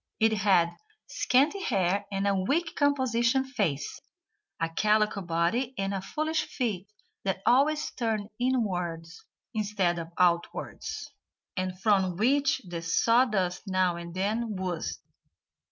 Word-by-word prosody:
It 220 Hz, 0 st, +4 dB
had 190 Hz, -5 st, +3 dB, 0.3 s
scanty 285 Hz, +6 st, +2 dB
hair 200 Hz, -, 0 dB
and 195 Hz, 0 st, -1 dB
a 200 Hz, -, +3 dB
weak 280 Hz, -, 0 dB
composition 260 Hz, -3 st, +2 dB
face, 190 Hz, -, -2 dB, 0.6 s
a 165 Hz, -, +1 dB
calico 210 Hz, +4 st, +2 dB
body 175 Hz, +10 st, 0 dB
and 195 Hz, 0 st, -1 dB
foolish 310 Hz, +7 st, -1 dB
feet 210 Hz, -7 st, -3 dB, 0.4 s
that 190 Hz, 0 st, -2 dB
always 295 Hz, +4 st, +3 dB
turned 220 Hz, -4 st, -2 dB
inwards 180 Hz, -10 st, -1 dB, 0.3 s
instead 200 Hz, -5 st, 0 dB
of 165 Hz, 0 st, -6 dB
outwards, 180 Hz, -, -1 dB, 0.4 s
and 185 Hz, -1 st, -3 dB
from 190 Hz, -4 st, +2 dB
which 275 Hz, -, +2 dB
the 170 Hz, -1 st, -5 dB
sawdust 205 Hz, 0 st, +2 dB
now 185 Hz, -2 st, +2 dB
and 170 Hz, 0 st, -8 dB
then 215 Hz, +2 st, -1 dB
oozed. 180 Hz, -3 st, -3 dB
200 Hz, 120 wpm, -28 LUFS, 180-250 Hz, 0.6 s, It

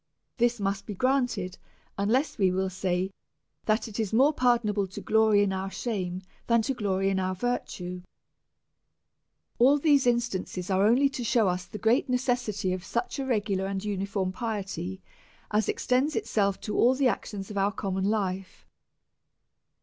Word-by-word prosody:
This 240 Hz, -1 st, +2 dB
must 195 Hz, 0 st, -2 dB
be 205 Hz, -, -5 dB
granted, 245 Hz, -6 st, 0 dB, 0.4 s
unless 225 Hz, +9 st, 0 dB
we 190 Hz, -2 st, +4 dB
will 190 Hz, +1 st, -1 dB
say 185 Hz, 0 st, -1 dB, 0.5 s
that 215 Hz, +2 st, +1 dB
it 220 Hz, 0 st, -7 dB
is 215 Hz, -4 st, -1 dB
more 270 Hz, +7 st, +4 dB
pardonable 235 Hz, -6 st, +2 dB
to 190 Hz, -, -8 dB
glory 220 Hz, -2 st, +4 dB
in 195 Hz, -1 st, 0 dB
our 190 Hz, +1 st, -3 dB
shame, 190 Hz, -5 st, -3 dB, 0.2 s
than 235 Hz, -1 st, +3 dB
to 270 Hz, -, -1 dB
glory 195 Hz, -4 st, 0 dB
in 190 Hz, -, 0 dB
our 185 Hz, 0 st, -1 dB
virtue. 180 Hz, -5 st, -3 dB, 1.6 s
All 270 Hz, +4 st, +6 dB
these 285 Hz, -3 st, +3 dB
instances 205 Hz, -6 st, -1 dB
are 190 Hz, +2 st, +4 dB
only 255 Hz, +5 st, +5 dB
to 260 Hz, -2 st, -5 dB
shew 230 Hz, -2 st, +3 dB
us 180 Hz, 0 st, -1 dB
the 210 Hz, -, -8 dB
great 225 Hz, +6 st, +2 dB
ne 250 Hz, -, +3 dB
cessity 245 Hz, -7 st, -1 dB
of 185 Hz, -1 st, -4 dB
such 240 Hz, +6 st, -3 dB
a 270 Hz, -, -2 dB
regular 205 Hz, -5 st, 0 dB
and 195 Hz, +1 st, -3 dB
uniform 195 Hz, -2 st, -2 dB
piety 195 Hz, -4 st, -4 dB, 0.5 s
as 210 Hz, 0 st, +1 dB
extends 265 Hz, +5 st, +1 dB
itself 200 Hz, -2 st, 0 dB
to 210 Hz, -, -4 dB
all 250 Hz, +2 st, +4 dB
the 265 Hz, 0 st, +3 dB
actions 205 Hz, -4 st, -3 dB
of 205 Hz, -, -5 dB
our 200 Hz, +1 st, +2 dB
common 190 Hz, -1 st, -2 dB
life. 195 Hz, -3 st, -2 dB
205 Hz, 165 wpm, -28 LUFS, 190-240 Hz, 1.6 s, All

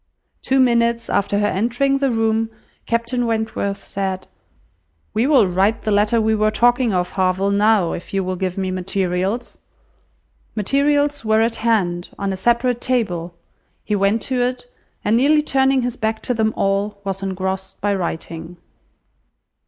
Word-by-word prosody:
Two 265 Hz, 0 st, +1 dB
minutes 235 Hz, -2 st, +2 dB
after 200 Hz, 0 st, +1 dB
her 205 Hz, -, +2 dB
entering 245 Hz, +7 st, +1 dB
the 275 Hz, -1 st, +1 dB
room, 225 Hz, -1 st, +1 dB, 0.4 s
Captain 235 Hz, +1 st, 0 dB
Wentworth 220 Hz, -3 st, -1 dB
said— 190 Hz, -1 st, -3 dB, 0.9 s
"We 230 Hz, +4 st, +1 dB
will 265 Hz, -9 st, +5 dB
write 195 Hz, +5 st, +1 dB
the 215 Hz, -, -1 dB
letter 210 Hz, +3 st, +3 dB
we 220 Hz, 0 st, +2 dB
were 215 Hz, 0 st, +2 dB
talking 240 Hz, +2 st, +2 dB
of, 180 Hz, -2 st, -1 dB
Harville, 190 Hz, +1 st, +1 dB
now, 205 Hz, -3 st, +3 dB
if 175 Hz, -, -7 dB
you 195 Hz, -1 st, 0 dB
will 185 Hz, 0 st, -2 dB
give 185 Hz, 0 st, -3 dB
me 190 Hz, -1 st, -1 dB
materials." 185 Hz, +3 st, -2 dB, 1.0 s
Materials 285 Hz, +6 st, +1 dB
were 220 Hz, 0 st, +3 dB
at 230 Hz, 0 st, 0 dB
hand, 185 Hz, -6 st, 0 dB
on 200 Hz, -1 st, -2 dB
a -, -, -2 dB
separate 240 Hz, +3 st, +1 dB
table; 180 Hz, -9 st, -1 dB, 0.5 s
he 210 Hz, -, -1 dB
went 200 Hz, +3 st, +1 dB
to 255 Hz, -2 st, -1 dB
it, 250 Hz, -, -1 dB, 0.4 s
and 215 Hz, +2 st, +3 dB
nearly 300 Hz, +4 st, +4 dB
turning 265 Hz, -2 st, +2 dB
his 245 Hz, -1 st, -3 dB
back 220 Hz, -1 st, -1 dB
to 250 Hz, -, -1 dB
them 220 Hz, -1 st, +1 dB
all, 200 Hz, +1 st, 0 dB
was 195 Hz, -1 st, -3 dB
engrossed 190 Hz, 0 st, -4 dB
by 205 Hz, 0 st, 0 dB
writing. 170 Hz, -2 st, -5 dB
215 Hz, 155 wpm, -20 LUFS, 190-240 Hz, 1.0 s, will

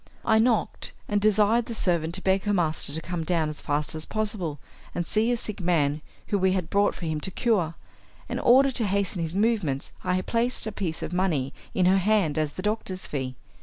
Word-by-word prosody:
I 220 Hz, -, +4 dB
knocked, 230 Hz, -1 st, +1 dB
and 205 Hz, 0 st, 0 dB
desired 215 Hz, +2 st, +3 dB
the 230 Hz, -, -5 dB
servant 170 Hz, -4 st, 0 dB
to 190 Hz, -, -2 dB
beg 190 Hz, +1 st, +2 dB
her 205 Hz, -1 st, +2 dB
master 160 Hz, -5 st, +1 dB
to 160 Hz, +2 st, +1 dB
come 175 Hz, -2 st, -3 dB
down 160 Hz, -2 st, 0 dB
as 150 Hz, -, -6 dB
fast 145 Hz, +1 st, -1 dB
as 155 Hz, 0 st, -3 dB
possible 205 Hz, -8 st, -2 dB, 0.4 s
and 175 Hz, -, -1 dB
see 220 Hz, +5 st, +1 dB
a 240 Hz, -, +1 dB
sick 215 Hz, -2 st, -2 dB
man 155 Hz, -4 st, +1 dB, 0.2 s
whom 200 Hz, -2 st, -1 dB
we 190 Hz, 0 st, +3 dB
had 180 Hz, -4 st, -2 dB
brought 200 Hz, 0 st, +2 dB
for 175 Hz, -, -6 dB
him 155 Hz, -2 st, -2 dB
to 190 Hz, -, -2 dB
cure; 185 Hz, -5 st, 0 dB, 0.5 s
and -, -, -3 dB
in -, -, -5 dB
order 270 Hz, +3 st, +6 dB
to 235 Hz, -4 st, +1 dB
hasten 195 Hz, -2 st, 0 dB
his 165 Hz, +1 st, -2 dB
movements 200 Hz, -, 0 dB
I 180 Hz, 0 st, +1 dB
placed 235 Hz, +1 st, 0 dB
a 220 Hz, -, -3 dB
piece 180 Hz, -5 st, -3 dB
of -, -, -5 dB
money 160 Hz, -8 st, 0 dB, 0.2 s
in 185 Hz, -, +3 dB
her 190 Hz, +2 st, +5 dB
hand 190 Hz, -6 st, +2 dB
as 150 Hz, -2 st, -1 dB
the 185 Hz, -, -6 dB
doctor's 205 Hz, -3 st, -2 dB
fee. 130 Hz, -3 st, -4 dB
185 Hz, 220 wpm, -26 LUFS, 160-215 Hz, 0.5 s, order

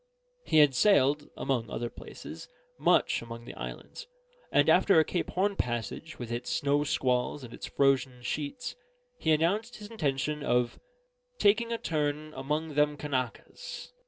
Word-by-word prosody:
He -, -, +3 dB
had 145 Hz, -3 st, +7 dB
sailed 145 Hz, -2 st, +3 dB
(among 125 Hz, -4 st, -1 dB
other 120 Hz, 0 st, -3 dB
places) -, -, -10 dB, 0.3 s
much -, -, +3 dB
among 115 Hz, 0 st, -8 dB
the -, -, -8 dB
islands; 480 Hz, -, -8 dB, 0.4 s
and -, -, +4 dB
after 195 Hz, -5 st, +6 dB
a 160 Hz, -, +4 dB
Cape 175 Hz, -, -2 dB
Horn 200 Hz, +2 st, +1 dB
passage 120 Hz, -, -3 dB
with 120 Hz, -2 st, -6 dB
its 120 Hz, +1 st, -3 dB
snow 145 Hz, +1 st, +2 dB
squalls 130 Hz, 0 st, 0 dB
and 120 Hz, -2 st, -9 dB
its -, -, -7 dB
frozen 130 Hz, -3 st, +1 dB
sheets, 150 Hz, -, -4 dB, 0.4 s
he -, -, -1 dB
announced 200 Hz, +10 st, +1 dB
his 210 Hz, -1 st, -10 dB
intention 150 Hz, -, -1 dB
of 125 Hz, -3 st, +1 dB, 0.6 s
"taking 220 Hz, +3 st, +3 dB
a 230 Hz, -, 0 dB
turn 155 Hz, -3 st, -2 dB
among 150 Hz, +3 st, -2 dB
them 150 Hz, 0 st, +2 dB
Kanakas." 145 Hz, -, -4 dB
145 Hz, 150 wpm, -29 LUFS, 125-160 Hz, 0.6 s, had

